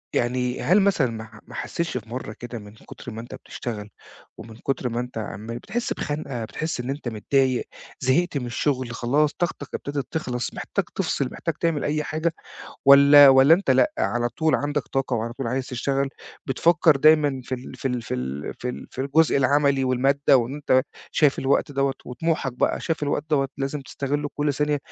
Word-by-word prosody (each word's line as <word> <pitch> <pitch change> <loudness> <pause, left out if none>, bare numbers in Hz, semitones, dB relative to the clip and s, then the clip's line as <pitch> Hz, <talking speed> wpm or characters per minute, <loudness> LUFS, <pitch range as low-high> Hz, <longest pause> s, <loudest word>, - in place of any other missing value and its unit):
يعني 125 +1 0
هل 190 +5 +4
مثلًا 165 -11 +2
ما 110 -1 -6
ح 110 -1 -14
ما - - -13
حسّيتش 170 -6 -3
في 110 -2 -8
مرّة 120 -3 -5
كده، 120 -1 -6
من 105 -1 -12
كتر 120 - -11
ما 110 +1 -6
أنت 120 - -9
بتشتغل، 105 -4 -7 0.5
ومن 115 -1 -10
كتر 135 0 -2
ما 120 +1 -2
أنت 125 -1 -5
عمال 110 +2 -5
بتحس 235 - -3
بِخَنقة، 140 -6 -4
بتحس 155 +6 -4
إن 125 +1 -4
أنت 140 -1 -4
متضايق، 130 +3 +1 0.3
زهقت 140 +4 +1
من 125 - -3
الشغل 130 0 -1
خلاص، 140 +6 +1
طاقتك 170 -5 -3
ابتدت 140 -1 -4
تِخلص، 125 -6 -3
محتاج - - -2
تفصل، - - -1
محتاج - - -3
تعمل 165 -4 0
أي 150 +1 0
حاجة، 160 +2 -1 0.5
والّا 140 +1 +9
والّا 135 +4 +7
أنت 180 -5 -1
لأ، 130 -1 +4
على 120 0 0
طول 160 +6 0
عندك 145 0 0
طاقة، 135 -1 -1
وعلى 115 +1 -3
طول 130 +1 -5
عايز 130 +2 -2
تشتغل، 135 +2 -1 0.4
بتفكر 160 +3 +4
دايمًا 150 -2 +4
في 130 - -3
ال 125 0 -9
في 135 - -3
ال 125 -2 -2
في 110 - -4
ال 65 +3 -4
في 125 - -4
ال 125 - -6
في - - -6
الجزء 145 +4 +3
العملي، 140 0 +3
والمادة، 135 +2 +3
وإن 125 +2 -1
أنت 130 -3 +2 0.3
شايف 150 -3 +3
الوقت 140 +2 +1
دوّة، 135 -1 +1
وطموحك 135 +1 -2
بقى 125 - 0
شايف 160 -2 -2
الوقت 145 0 -1
دوّة، 135 -2 +2
لازم 140 +1 -3
تستغل 145 +2 -3
كلّ 145 0 0
ثانية 150 +1 +1
135 Hz, 190 wpm, -24 LUFS, 120-145 Hz, 0.5 s, والّا